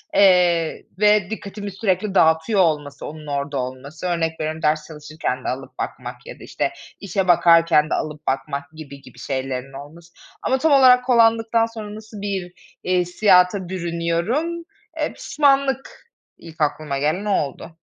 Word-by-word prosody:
eee, 180 -4 +4 0.2
ve 210 -2 +4
dikkatimi 205 -2 -6
sürekli 195 0 -1
dağıtıyor 160 +6 +3
olması 150 -4 -1
onun 155 0 -9
orada 140 0 -3
olması. 130 +7 -5
Örnek 165 -2 -1
veriyorum, 155 +1 -3
ders 155 0 0
çalışırken 150 -4 -5
de - - -1
alıp 130 +1 -6
bakmak - - -5
ya - - -10
da, - - -12
işte, - - -2 0.3
işe 195 -1 -2
bakarken 165 -3 +5
de - - -1
alıp 150 -1 -4
bakmak 140 +2 -3
gibi 140 -3 -11
gibi 125 - -16
şeylerin 135 0 -4
olması 160 +5 -12 0.3
ama 265 - +1
tam 310 +3 +1
olarak 250 -2 +6
kullandıktan 230 -2 +3
sonra 215 -2 -8
nasıl 215 -1 -10
bir, 190 -3 -4 0.3
iii, 180 0 +1
hissiyata 180 0 +3
bürünüyorum, 180 - -2 0.4
eee, - - -1
pişmanlık 275 -2 0 0.3
ilk 160 -2 -12
aklıma 150 -1 -1
gelen 155 +8 -1
o 210 - 0
oldu. 155 +3 -7
170 Hz, 150 wpm, -21 LUFS, 150-210 Hz, 0.4 s, olarak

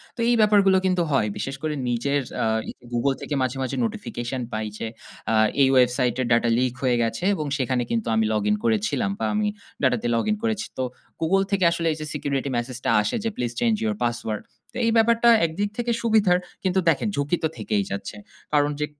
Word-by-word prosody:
তো - - -16
এই 240 - +4
ব্যাপারগুলো 200 -3 +5
কিন্তু 185 -1 +2
হয়। 135 -6 +2
বিশেষ 135 +6 -3
করে 155 -1 -1 0.2
নিজের 140 +4 0 0.2
আ - - +1 0.2
ই - - -3 0.2
Google 135 +3 +1
থেকে - - -4
মাঝে, 130 +1 -1
মাঝে 130 - -3
notification 135 - -4
পাই 110 0 -2
যে 115 - -4 0.4
আ - - +2 0.3
এই 135 - +6
website 125 -1 +3
এর - - 0
data 115 0 +3
leak 125 0 +1
হয়ে 125 -2 +3
গেছে 115 +9 -3
এবং 155 -6 -2
সেখানে 130 -2 0
কিন্তু 115 -1 -1
আমি 110 0 +2
login 105 0 +1
করেছিলাম 110 - +1
বা - - -1
আমি 210 0 +1 0.3
data 130 -2 +3
তে - - 0
login 215 - +1
করেছি। 220 -1 -1
তো - - -1 0.4
Google 195 +4 +3
থেকে 195 -2 +1
আসলে 170 -1 -1
এই - - -8
যে 155 - -4
security 140 -2 -2
message 120 +1 -4
টা - - +3
আসে 105 - -1
যে 225 - 0
please 120 -1 -2
change 225 -3 +2
your 215 -1 0
password. 120 -3 -2 0.3
তো - - -7
এই 230 - +3
ব্যাপারটা 230 +1 +4 0.2
একদিক 190 +6 -2
থেকে 240 0 -1
সুবিধার, 215 -6 +4 0.3
কিন্তু 190 0 +2
দেখেন 160 +7 +1
ঝুঁকি 145 +4 0
তো - - +4
থেকেই 105 -2 0
যাচ্ছে। 100 +2 -5 0.4
কারণ 145 0 +3
যে 150 - +1
140 Hz, 210 wpm, -24 LUFS, 120-195 Hz, 0.4 s, এই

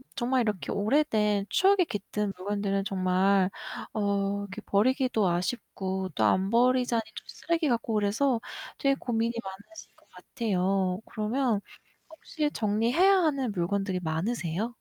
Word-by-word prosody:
정말 255 +1 +1
이렇게 210 -5 -2
오래된 210 -3 +1
추억이 385 -1 +4
깃든 205 - -3
물건들은 195 +1 -1
정말 190 0 +2 0.4
어 200 -1 0
이렇게 200 -2 -7
버리기도 250 0 +2
아쉽고 190 0 -2
또 110 - +1
안 190 - +2
버리자니 245 0 +3
또 - - -11
쓰레기 335 -3 -1
같고 235 -2 0
그래서 220 +5 +1 0.4
되게 275 -1 +2
고민이 230 -3 -1
많으실 200 +12 -11
것 - - -28
같애요. 190 -4 -1
그러면 220 0 -1 0.5
혹시 315 -1 -3
정리해야 235 - +3
하는 280 -8 +1
물건들이 190 0 -1
많으세요? 175 +4 -2
210 Hz, 310 characters per minute, -28 LUFS, 195-250 Hz, 0.5 s, 추억이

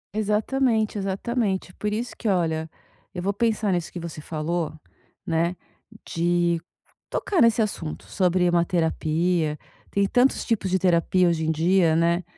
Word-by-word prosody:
Exatamente, 215 +1 +1
exatamente. 195 -1 -2
Por 210 +2 -3
isso 235 +4 -3
que, 225 - -2
olha, 160 -4 0 0.5
eu 180 - -3
vou 200 +2 0
pensar 215 -1 +1
nisso 175 -2 -2
que 175 - -6
você 165 -2 -7
falou, 160 +1 -2 0.5
né? 170 +2 0 0.5
De 170 0 +1 0.5
tocar 370 -6 0
nesse 230 -1 +5
assunto 85 - -5
sobre 180 - +1
uma 175 -1 +3
terapia, 160 -1 0 0.3
tem 200 0 +1
tantos 250 +5 +2
tipos 220 -5 0
de 190 - +2
terapia 180 0 +3
hoje 165 -2 0
em - - +3
dia, 165 +1 +3
né? 170 +2 +2
180 Hz, 145 wpm, -24 LUFS, 165-210 Hz, 0.5 s, nesse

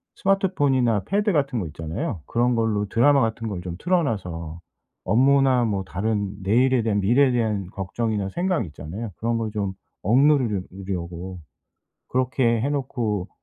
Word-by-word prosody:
스마트폰이나 145 - +2
패드 205 +1 +1
같은 140 -6 0
거 90 - -3
있잖아요? 80 - -4
그런 120 +1 +1
걸로 110 -2 +1
드라마 140 +5 +4
같은 115 -1 -1
걸 95 -5 -4
좀 85 -1 -6
틀어 180 - +2
놔서 85 - -4 0.4
업무나 130 +3 +4
뭐 100 -3 -1
다른 100 +1 -2
내일에 120 +6 +3
대한 105 -2 0
미래에 125 +7 +4
대한 110 -6 0
걱정이나 100 +1 -2
생각 175 - 0
있잖아요. 85 +8 -7
그런 115 +1 0
걸 110 -2 -2
좀 100 -3 -2 0.3
억누르려 125 -2 +3 0.3
려고 90 0 -5 0.7
그렇게 125 -2 +1
해 130 +6 0
놓고 120 -9 -2
115 Hz, 320 characters per minute, -24 LUFS, 95-130 Hz, 0.7 s, 드라마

